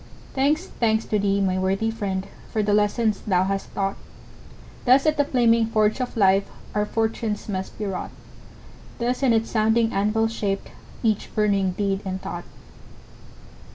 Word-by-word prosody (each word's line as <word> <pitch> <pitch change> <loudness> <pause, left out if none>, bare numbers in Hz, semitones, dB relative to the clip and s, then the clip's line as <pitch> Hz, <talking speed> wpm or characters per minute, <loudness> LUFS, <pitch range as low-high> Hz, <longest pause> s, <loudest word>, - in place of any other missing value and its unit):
Thanks, 295 +6 +1
thanks 220 -7 0
to 210 - 0
thee, 200 0 +1
my 185 -1 +1
worthy 195 +4 0
friend, 195 -4 -3 0.2
For 215 - 0
the 205 0 +1
lesson 210 +2 +2
thou 185 -2 +3
hast 195 +1 -2
taught! 195 0 -1 0.9
Thus 265 +3 +5
at 310 -1 +3
the 290 - +3
flaming 230 -4 +3
forge 215 +1 +1
of 250 -1 -4
life 195 -1 +4 0.2
Our 210 0 0
fortunes 225 -1 -2
must 190 -2 -4
be 210 - -3
wrought; 195 -2 -3 0.9
Thus 245 +2 -1
on 265 -3 +4
its 225 0 +1
sounding 225 +1 +2
anvil 215 +3 +2
shaped 205 -3 -3 0.3
Each 220 -3 +1
burning 200 -3 +2
deed 195 0 -1
and 190 -1 -3
thought. 175 -1 -6
210 Hz, 155 wpm, -24 LUFS, 195-225 Hz, 0.9 s, Thus